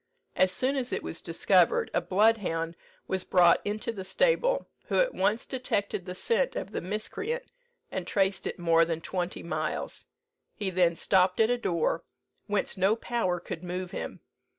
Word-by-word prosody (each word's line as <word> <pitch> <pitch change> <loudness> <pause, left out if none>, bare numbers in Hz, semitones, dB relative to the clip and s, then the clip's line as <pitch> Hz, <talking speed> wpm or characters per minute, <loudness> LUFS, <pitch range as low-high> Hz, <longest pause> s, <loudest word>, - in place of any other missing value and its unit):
As 185 0 +4
soon 260 +8 0
as 255 -1 -1
it - - -2
was - - -5
discovered, 475 -1 +3
a - - +2
bloodhound 185 -5 +1 0.3
was 190 -1 -1
brought 175 -2 +5
into 215 +3 -2
the 200 -4 -6
stable, - - +2 0.2
who - - -1
at - - +2
once 210 +4 +1
detected 200 -7 -2
the 180 - -5
scent 470 - +1
of - - -4
the - - -3
miscreant, 425 - -3 0.5
and 185 -2 -4
traced 195 -1 +1
it - - -4
more 165 -1 +4
than 165 -1 -1
twenty 180 +1 -3
miles. 170 - -3 0.5
He 200 -3 -2
then 175 -2 +3
stopped 185 +1 +2
at 225 +1 +4
a 245 - +2
door, 170 -5 0 0.4
whence 205 -2 -1
no 190 +3 +3
power 225 -7 -1
could 170 0 -7
move 180 +1 -4
him. - - -6
190 Hz, 170 wpm, -28 LUFS, 180-235 Hz, 0.5 s, brought